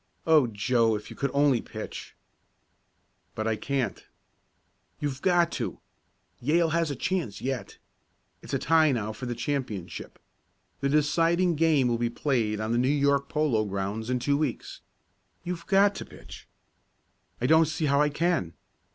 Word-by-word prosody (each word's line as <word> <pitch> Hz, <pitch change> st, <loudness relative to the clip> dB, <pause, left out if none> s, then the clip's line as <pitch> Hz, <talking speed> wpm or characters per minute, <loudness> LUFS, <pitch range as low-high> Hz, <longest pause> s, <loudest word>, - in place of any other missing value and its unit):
Oh, 155 Hz, -5 st, +5 dB
Joe, 115 Hz, +1 st, +1 dB
if 105 Hz, -, -7 dB
you -, -, -9 dB
could 140 Hz, -, -1 dB
only 140 Hz, -4 st, +3 dB
pitch!" -, -, -8 dB, 1.2 s
"But 110 Hz, 0 st, -2 dB
I 110 Hz, -, +1 dB
can't." 135 Hz, +2 st, -2 dB, 1.0 s
"You've 145 Hz, -1 st, -1 dB
just 135 Hz, +1 st, -10 dB
got 175 Hz, -2 st, +3 dB
to! -, -, -4 dB, 0.6 s
Yale 165 Hz, +6 st, +2 dB
has 165 Hz, -1 st, +1 dB
a 140 Hz, -, -3 dB
chance 165 Hz, -, -2 dB
yet. 130 Hz, -1 st, -4 dB, 0.6 s
It's -, -, -4 dB
a -, -, +3 dB
tie 160 Hz, -1 st, +4 dB
now 110 Hz, -2 st, -2 dB
for 125 Hz, +4 st, -7 dB
the 120 Hz, -, -3 dB
championship. 125 Hz, -, -4 dB, 0.6 s
The 140 Hz, -, 0 dB
deciding 165 Hz, +4 st, +2 dB
game 150 Hz, -4 st, +3 dB
will 120 Hz, -1 st, 0 dB
be 120 Hz, 0 st, 0 dB
played 115 Hz, -4 st, -1 dB
on 110 Hz, +1 st, -2 dB
the 120 Hz, -, +2 dB
New 125 Hz, -, +2 dB
York 140 Hz, -1 st, +2 dB
Polo 145 Hz, -8 st, +1 dB
Grounds 100 Hz, +3 st, -3 dB
in 125 Hz, -, +1 dB
two 140 Hz, +3 st, 0 dB
weeks. 145 Hz, -6 st, -3 dB, 0.6 s
You've 175 Hz, -1 st, -5 dB
got 200 Hz, +1 st, +4 dB
to -, -, -6 dB
pitch!" -, -, -13 dB, 0.9 s
"I 125 Hz, -, -1 dB
don't 160 Hz, +3 st, +5 dB
see 160 Hz, +1 st, -2 dB
how 140 Hz, 0 st, +3 dB
I 150 Hz, -, +3 dB
can." 150 Hz, -, 0 dB
140 Hz, 160 wpm, -27 LUFS, 120-160 Hz, 1.2 s, Oh